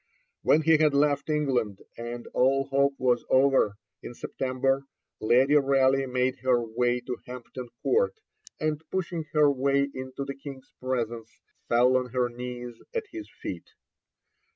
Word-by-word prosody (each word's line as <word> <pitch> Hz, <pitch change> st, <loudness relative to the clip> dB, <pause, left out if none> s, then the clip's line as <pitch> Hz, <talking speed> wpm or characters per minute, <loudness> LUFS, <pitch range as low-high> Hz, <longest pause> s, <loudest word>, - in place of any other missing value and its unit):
When 155 Hz, -, +4 dB
he 160 Hz, 0 st, +5 dB
had 150 Hz, -2 st, +3 dB
left 145 Hz, 0 st, +2 dB
England, 130 Hz, -10 st, 0 dB
and 120 Hz, 0 st, -6 dB
all 135 Hz, +2 st, +3 dB
hope 140 Hz, 0 st, +2 dB
was 125 Hz, -2 st, +2 dB
over, 130 Hz, -6 st, +4 dB, 0.3 s
in 120 Hz, -, -8 dB
September, 135 Hz, +2 st, -1 dB, 0.3 s
Lady 130 Hz, +6 st, +4 dB
Raleigh 135 Hz, -1 st, +3 dB
made 125 Hz, 0 st, 0 dB
her 125 Hz, 0 st, +3 dB
way 120 Hz, +2 st, 0 dB
to 125 Hz, -1 st, -5 dB
Hampton 125 Hz, 0 st, -8 dB
Court, 470 Hz, +3 st, +2 dB, 0.4 s
and, 155 Hz, -1 st, -1 dB
pushing 175 Hz, -3 st, -3 dB
her 150 Hz, -2 st, +5 dB
way 140 Hz, +1 st, +1 dB
into 130 Hz, +1 st, -5 dB
the 140 Hz, -, -4 dB
King's 135 Hz, -1 st, -10 dB
presence, 120 Hz, -3 st, -3 dB, 0.3 s
fell 125 Hz, +2 st, +4 dB
on 125 Hz, -1 st, +1 dB
her 125 Hz, -1 st, +1 dB
knees 120 Hz, -1 st, -7 dB
at 455 Hz, -2 st, -1 dB
his 330 Hz, -1 st, -8 dB
feet. -, -, -8 dB
130 Hz, 145 wpm, -27 LUFS, 125-140 Hz, 0.4 s, he